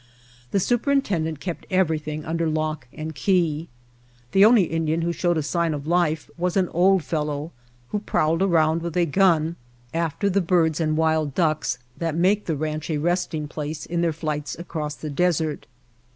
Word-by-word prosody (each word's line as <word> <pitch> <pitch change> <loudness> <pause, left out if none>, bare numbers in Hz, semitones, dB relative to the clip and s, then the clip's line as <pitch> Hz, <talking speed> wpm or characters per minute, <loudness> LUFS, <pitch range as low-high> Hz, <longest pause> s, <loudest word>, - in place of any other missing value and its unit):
The 200 - +1
superintendent 205 - 0
kept 175 +1 -5
everything 155 -5 0
under 165 0 -1
lock 155 -4 -2
and 155 +1 -6
key. 165 0 +1 0.6
The 195 - +5
only 220 -1 +7
Indian 165 0 -1
who 170 0 0
showed 175 +1 +1
a 155 - 0
sign 165 +1 0
of 145 -1 -6
life 160 -2 +1
was 180 +2 0
an 185 -2 +2
old 185 +1 +3
fellow 150 0 -2 0.4
who 210 - -1
prowled 165 -4 +1
around 165 -3 +3
with 170 0 -4
a 175 - +4
gun 170 -1 +2 0.4
after 165 +4 -1
the 200 0 +2
birds 165 -3 +2
and 155 -1 +1
wild 160 -3 +1
ducks 155 -6 +1 0.2
that 165 -2 -1
make 195 +5 +2
the 160 -3 0
ranch 155 +1 -3
a 155 - 0
resting 165 -1 -1
place 150 0 -5
in 170 0 -2
their 170 -1 +2
flights 150 -2 -4
across 155 -3 -4
the 155 0 -6
desert. 160 -2 0
160 Hz, 170 wpm, -24 LUFS, 155-175 Hz, 0.6 s, only